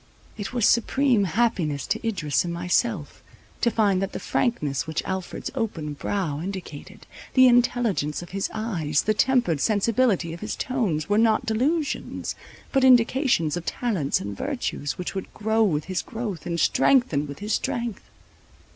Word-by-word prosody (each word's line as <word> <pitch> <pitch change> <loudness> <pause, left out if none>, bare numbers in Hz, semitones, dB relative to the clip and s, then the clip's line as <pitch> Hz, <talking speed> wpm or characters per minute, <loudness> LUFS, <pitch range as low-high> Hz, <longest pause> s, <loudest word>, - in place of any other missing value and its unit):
It 205 -2 -5
was 240 -4 +1
supreme 240 -2 +3
happiness 175 - 0
to 220 +2 -1
Idris 150 - 0
and 175 - -4
myself, 175 - -1 0.4
to 240 - +4
find 205 -5 +2
that 195 - -3
the - - -4
frankness 155 - -1
which 160 - -2
Alfred's 190 -1 -4
open 160 -9 -3
brow 155 -1 -2
indicated, 190 0 -7 0.3
the 260 0 +8
intelligence 240 -11 +2
of 175 - -12
his 195 +1 -2
eyes, 170 -10 -1
the 215 - +2
tempered 240 - +2
sensibility 210 -4 +2
of 170 - -8
his 215 +3 -4
tones, 215 - -1
were 205 +1 +2
not 225 -1 +3
delusions, 280 +8 -1 0.4
but 270 -2 +2
indications 245 - +4
of 175 - -4
talents 190 - -1
and 100 0 -5
virtues, 145 +7 -3
which 180 - -4
would 190 -1 -5
"grow 220 +1 +1
with 160 -9 +2
his 185 -1 -2
growth, 210 -9 -5
and 170 -1 -2
strengthen 165 - +3
with 140 - -8
his 210 +1 -3
strength." 235 -4 -2
200 Hz, 155 wpm, -25 LUFS, 165-235 Hz, 0.4 s, the